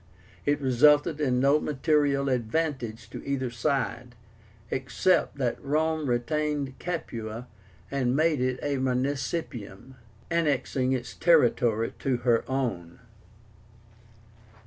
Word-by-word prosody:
It 145 Hz, 0 st, +2 dB
resulted 145 Hz, +4 st, +4 dB
in 125 Hz, -4 st, +2 dB
no 140 Hz, +3 st, +4 dB
material 145 Hz, -1 st, +1 dB
advantage 125 Hz, -3 st, -2 dB
to -, -, -7 dB
either 130 Hz, -3 st, -2 dB
side, 120 Hz, -1 st, -2 dB, 0.6 s
except 150 Hz, +6 st, +1 dB
that 125 Hz, -4 st, -2 dB
Rome 155 Hz, +1 st, 0 dB
retained 145 Hz, +2 st, -1 dB
Capua 115 Hz, -9 st, -5 dB, 0.5 s
and 130 Hz, -2 st, 0 dB
made 155 Hz, -2 st, +2 dB
it 130 Hz, 0 st, 0 dB
a 145 Hz, -1 st, 0 dB
municipium, 130 Hz, -, -3 dB, 0.4 s
annexing 140 Hz, -5 st, +1 dB
its 125 Hz, -1 st, -4 dB
territory 120 Hz, -8 st, +3 dB
to 130 Hz, -2 st, 0 dB
her 120 Hz, -1 st, +2 dB
own. 105 Hz, -11 st, -3 dB
135 Hz, 100 wpm, -27 LUFS, 120-150 Hz, 0.6 s, resulted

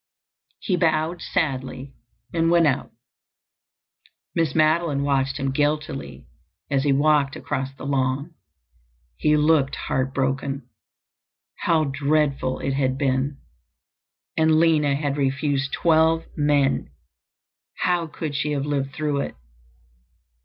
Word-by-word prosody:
He 185 Hz, -4 st, -1 dB
bowed 165 Hz, 0 st, +1 dB
sadly 135 Hz, -5 st, -2 dB, 0.4 s
and 165 Hz, -1 st, +2 dB
went 170 Hz, -1 st, +5 dB
out. 140 Hz, -3 st, 0 dB, 1.4 s
Miss 165 Hz, -4 st, 0 dB
Madeline 155 Hz, -2 st, +2 dB
watched 135 Hz, -1 st, 0 dB
him 135 Hz, -1 st, -1 dB
guiltily 145 Hz, -, -2 dB, 0.5 s
as 135 Hz, -1 st, +2 dB
he 145 Hz, -, +2 dB
walked 145 Hz, 0 st, +3 dB
across 130 Hz, 0 st, -3 dB
the 135 Hz, -, -9 dB
lawn. 140 Hz, +3 st, -1 dB, 0.8 s
He 150 Hz, -, +2 dB
looked 150 Hz, -2 st, +3 dB
heart 130 Hz, 0 st, -2 dB
broken. 135 Hz, 0 st, -2 dB, 0.9 s
How 160 Hz, -2 st, +2 dB
dreadful 140 Hz, -1 st, 0 dB
it 135 Hz, -, -1 dB
had 130 Hz, -1 st, 0 dB
been! 135 Hz, 0 st, 0 dB, 1.0 s
And 160 Hz, 0 st, +4 dB
Lina 155 Hz, -4 st, +3 dB
had 145 Hz, -1 st, -2 dB
refused 140 Hz, 0 st, 0 dB
twelve 160 Hz, 0 st, +3 dB
men! 145 Hz, -, +1 dB, 0.9 s
How 175 Hz, -2 st, +1 dB
could 155 Hz, -1 st, -5 dB
she 145 Hz, +2 st, -1 dB
have 140 Hz, -1 st, -1 dB
lived 140 Hz, -2 st, -2 dB
through 150 Hz, -2 st, -1 dB
it? -, -, -5 dB
145 Hz, 115 wpm, -23 LUFS, 135-155 Hz, 1.4 s, went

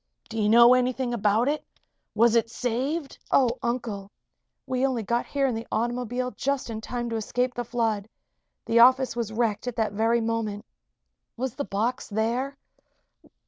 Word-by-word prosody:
"Do 225 Hz, -1 st, -4 dB
you 210 Hz, -, +2 dB
know 235 Hz, +2 st, +8 dB
anything 255 Hz, 0 st, +1 dB
about 220 Hz, +2 st, +2 dB
it? 300 Hz, +1 st, 0 dB, 0.5 s
Was 230 Hz, 0 st, +4 dB
it 230 Hz, -1 st, +2 dB
saved?" 260 Hz, +6 st, -2 dB
"Oh, 250 Hz, -2 st, +3 dB
Uncle! 235 Hz, -5 st, -3 dB, 0.6 s
We 255 Hz, 0 st, -1 dB
only 255 Hz, -4 st, 0 dB
got 235 Hz, +4 st, -1 dB
here 280 Hz, -1 st, 0 dB
in 260 Hz, -, +1 dB
the 225 Hz, +1 st, -5 dB
automobile 245 Hz, +2 st, -1 dB
just 275 Hz, -3 st, -2 dB
in 220 Hz, -1 st, -5 dB
time 240 Hz, +1 st, -4 dB
to 225 Hz, -, -1 dB
escape 245 Hz, +3 st, -1 dB
the 245 Hz, -, -3 dB
flood. 225 Hz, -3 st, -1 dB, 0.6 s
The 230 Hz, -, +3 dB
office 255 Hz, +1 st, +5 dB
was 230 Hz, -3 st, -2 dB
wrecked 225 Hz, 0 st, -1 dB
at 245 Hz, -, -3 dB
that 220 Hz, -3 st, 0 dB
very 225 Hz, +3 st, +2 dB
moment. 225 Hz, -2 st, -2 dB, 0.7 s
Was 255 Hz, 0 st, -2 dB
the 285 Hz, -, -4 dB
box 230 Hz, +6 st, -2 dB
there?" 235 Hz, +6 st, -1 dB
235 Hz, 165 wpm, -26 LUFS, 225-255 Hz, 0.7 s, know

